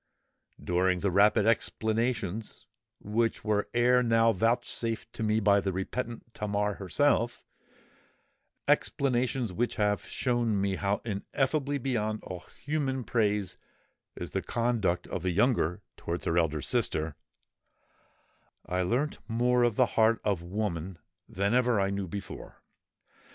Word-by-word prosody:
During 90 0 +1
the 100 - +1
rapid 105 +3 +4
explanations 110 -2 -1 0.3
which 115 +2 -1
were 105 -1 0
ere 125 +1 +4
now 115 -1 +4
vouchsafed 115 +1 -1
to - - -7
me 110 0 +2
by 100 -1 +4
the 95 -1 -1
repentant 115 +5 -4
Tamar 105 0 -1
herself,—explanations 120 - -2
which 120 +6 -1
have 105 -1 0
shown 120 -5 0
me 95 -1 0
how 100 0 -1
ineffably 135 +7 -1
beyond 110 -5 -2
all 90 -1 -7 0.2
human 135 -3 -1
praise 105 -4 0 0.6
is - - -6
the - - -1
conduct 110 -7 0
of - - -4
the 90 - 0
younger 95 -3 +1
towards 85 +1 -4
her 80 - +1
elder 80 -4 +1
sister,—I 80 +3 -6
learnt 125 +11 0
more 120 +2 +2
of 120 -3 +3
the 130 - +5
heart 115 0 +3
of 100 -5 +1
woman 90 -1 -3 0.3
than 100 +4 0
ever 125 -3 +3
I 95 0 +1
knew 100 -1 -3
before. 100 +3 -8
110 Hz, 125 wpm, -29 LUFS, 95-120 Hz, 0.6 s, the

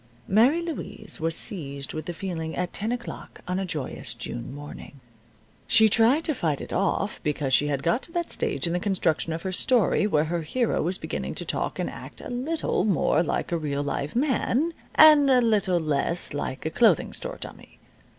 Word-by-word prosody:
Mary 245 - +4
Louise 295 -10 -4
was 165 0 0
seized 140 -7 -3
with 155 0 -5
the - - -2
feeling 165 -4 -4
at 180 0 -3
ten 215 +3 -2
o'clock 240 -1 -7
on 180 +1 -1
a 195 - -2
joyous 135 -7 -5
June 115 +1 -6
morning. 145 0 -10 0.7
She 220 -1 +6
tried 235 +9 +4
to 310 - +1
fight 155 - -1
it - - -7
off 195 +1 0
because 145 -3 -1
she 145 - +4
had 140 -2 -2
got 170 +10 +1
to - - -9
that 345 -1 -2
stage 455 - +1
in 170 - 0
the 180 - +1
construction 175 -5 0
of 165 +1 -4
her 190 - -2
story 210 +1 +2
where 155 -7 +2
her 170 +2 -2
hero 235 +10 0
was 180 +4 -1
beginning - - -4
to - - -3
talk - - -2
and - - -1
act - - -9
a - - -8
little 270 - -1
more 180 -5 +2
like 175 - -2
a 170 - 0
real 145 -2 -2
live 145 +3 -3
man, 280 +4 +1 0.2
and 300 -3 +8
a 255 -1 +6
little 205 -6 +2
less 155 +2 0
like 145 -1 -4
a 160 - -1
clothing 215 -5 +3
store - - -5
dummy. - - -10
180 Hz, 200 wpm, -26 LUFS, 155-235 Hz, 0.7 s, and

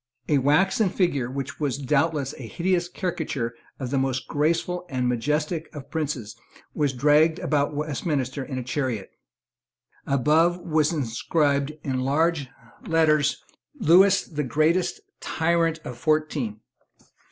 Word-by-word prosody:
A 145 -2 +3
waxen 190 - +3
figure, 145 -11 0
which 135 0 -5
was 145 -4 -1
doubtless 145 0 0
a 120 - -7
hideous 175 - 0
caricature 140 -10 -3 0.3
of 130 -2 -4
the 140 - +2
most 130 -1 -1
graceful 170 +4 0
and 130 -3 -1
majestic 150 +7 -1
of 140 -2 -9
princes, 145 -9 -3 0.4
was 145 -2 +1
dragged 150 +5 +4
about 145 -1 0
Westminster 145 -2 -2
in 130 -1 -5
a 130 - -3
chariot. 125 -5 -3 1.0
Above 155 +6 +3
was 155 -3 +1
inscribed, 140 +1 0
in 130 -3 -1
large 145 +1 +1 0.4
letters, 155 -3 +2 0.4
"Lewis 195 +1 +5
the 150 -3 -4
greatest 160 - +1 0.2
tyrant 165 0 +1
of 125 - -7
fourteen." 150 -8 0
150 Hz, 125 wpm, -25 LUFS, 135-165 Hz, 1.0 s, Lewis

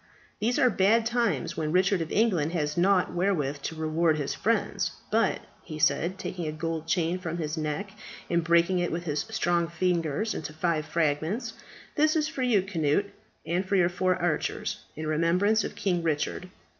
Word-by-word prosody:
These 235 +4 +1
are 250 -2 +4
bad 215 +4 +3
times 235 0 0
when 155 -1 -2
Richard 185 +1 +3
of 160 - -4
England 180 -8 +2
has 150 -3 -1
nought 185 +1 +3
wherewith 155 -7 0
to 160 - -4
reward 160 0 +1
his 145 -2 -2
friends. - - 0 0.2
But," - - +2 0.2
he 155 - -8
said, 170 +4 +1
taking 175 -4 -4
a - - -1
gold 160 +1 -4
chain 175 +1 0
from 170 -2 -4
his 155 -1 -3
neck 155 +5 -3 0.4
and 170 -1 +1
breaking 170 +2 +3
it 175 - -1
with 170 +1 -3
his 150 -3 -2
strong 175 -1 +1
fingers 170 +3 0
into 150 - -5
five 155 -1 -1
fragments, 165 - -1 0.4
"that 310 +1 +3
is 310 -1 +2
for 310 -4 -5
you, 230 -7 +3
Cnut, 170 +2 0 0.3
and 175 +3 0
for 195 +1 -1
your 175 -2 +4
four 185 +1 +1
archers, 170 -3 -2 0.2
in 155 - -5
remembrance 175 +8 +2
of - - -5
King 180 -3 0
Richard." 165 +3 -2
170 Hz, 180 wpm, -27 LUFS, 155-195 Hz, 0.4 s, are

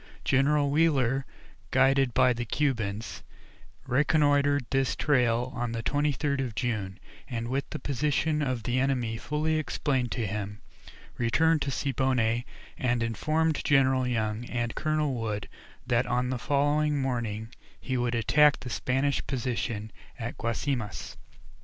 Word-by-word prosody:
General 140 +1 +3
Wheeler, 135 -4 +2 0.4
guided 135 -1 +3
by 125 - +5
the 120 0 -3
Cubans, 115 -5 -2 0.6
reconnoitred 145 0 +3
this 135 -2 +1
trail 125 -3 +1
on 120 -1 -2
the 115 -1 -3
23rd 145 0 0
of 120 -5 -5
June, 105 -4 -2 0.3
and 115 -2 -3
with 135 +3 -2
the - - -4
position 150 +2 0
of 130 -5 -1
the 125 +1 0
enemy 125 -4 0
fully 155 +5 -1
explained 130 -3 -1
to 115 - -2
him, 105 0 -4 0.6
returned 155 +7 +3
to 140 - -1
Siboney 130 -4 0 0.3
and 120 -2 +1
informed 155 +8 0
General 130 -2 +3
Young 110 -2 -1
and 120 -1 -2
Colonel 155 -2 0
Wood 110 -4 -3 0.4
that 120 +1 +1
on 125 +1 0
the 130 - -2
following 145 +2 +1
morning 115 -5 -2 0.3
he 130 - -3
would 120 -1 0
attack 145 +6 +4
the 125 -1 -6
Spanish 135 +4 0
position 120 -4 -2 0.3
at 115 0 -5
Guasimas. 115 -1 -3
130 Hz, 135 wpm, -28 LUFS, 115-145 Hz, 0.6 s, by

